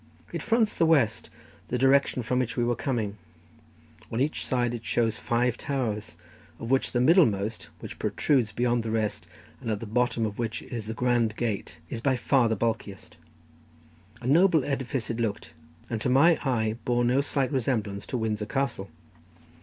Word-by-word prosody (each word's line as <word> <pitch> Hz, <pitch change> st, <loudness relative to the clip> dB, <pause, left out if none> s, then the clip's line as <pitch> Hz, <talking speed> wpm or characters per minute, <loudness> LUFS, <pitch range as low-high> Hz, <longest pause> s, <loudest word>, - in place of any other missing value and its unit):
It -, -, -3 dB
fronts 225 Hz, -2 st, +1 dB
the 165 Hz, -, +3 dB
west, 130 Hz, -10 st, +2 dB, 0.4 s
the 125 Hz, -, -1 dB
direction 135 Hz, 0 st, +3 dB
from 125 Hz, +3 st, 0 dB
which 125 Hz, -1 st, -2 dB
we 120 Hz, -, +2 dB
were 120 Hz, 0 st, +1 dB
coming; 110 Hz, -5 st, -2 dB, 0.9 s
on 115 Hz, -, -2 dB
each 145 Hz, +4 st, 0 dB
side 120 Hz, -2 st, 0 dB
it 115 Hz, -1 st, -5 dB
shows 115 Hz, -1 st, 0 dB
five 120 Hz, 0 st, 0 dB
towers, 110 Hz, -, -3 dB, 0.4 s
of 115 Hz, -, -5 dB
which 135 Hz, -, +2 dB
the 120 Hz, -, +1 dB
middlemost, 115 Hz, -, +3 dB
which -, -, -8 dB
protrudes 125 Hz, -7 st, +1 dB
beyond 120 Hz, +2 st, +1 dB
the 115 Hz, -, -4 dB
rest, 110 Hz, -2 st, -2 dB, 0.3 s
and -, -, -5 dB
at 105 Hz, -2 st, -1 dB
the 115 Hz, -, -6 dB
bottom 115 Hz, +1 st, 0 dB
of 105 Hz, 0 st, -5 dB
which 115 Hz, -1 st, -3 dB
is 115 Hz, -4 st, -6 dB
the 110 Hz, -, -4 dB
grand 120 Hz, -3 st, +1 dB
gate, 110 Hz, -4 st, -3 dB
is 115 Hz, -, -4 dB
by 130 Hz, +1 st, +2 dB
far 125 Hz, -1 st, +2 dB
the 110 Hz, -, +1 dB
bulkiest. 110 Hz, -2 st, -3 dB, 1.1 s
A -, -, -9 dB
noble 160 Hz, +2 st, +4 dB
edifice 135 Hz, -4 st, -2 dB
it 115 Hz, -, -4 dB
looked, 105 Hz, -7 st, -2 dB, 0.4 s
and 115 Hz, -2 st, -3 dB
to -, -, 0 dB
my 155 Hz, +6 st, +5 dB
eye 110 Hz, -4 st, 0 dB
bore 120 Hz, 0 st, +1 dB
no 125 Hz, +3 st, +3 dB
slight 140 Hz, -1 st, -1 dB
resemblance 110 Hz, -7 st, -1 dB
to 125 Hz, -, -2 dB
Windsor 110 Hz, -2 st, -2 dB
Castle. 135 Hz, -8 st, -2 dB
120 Hz, 175 wpm, -27 LUFS, 110-130 Hz, 1.1 s, my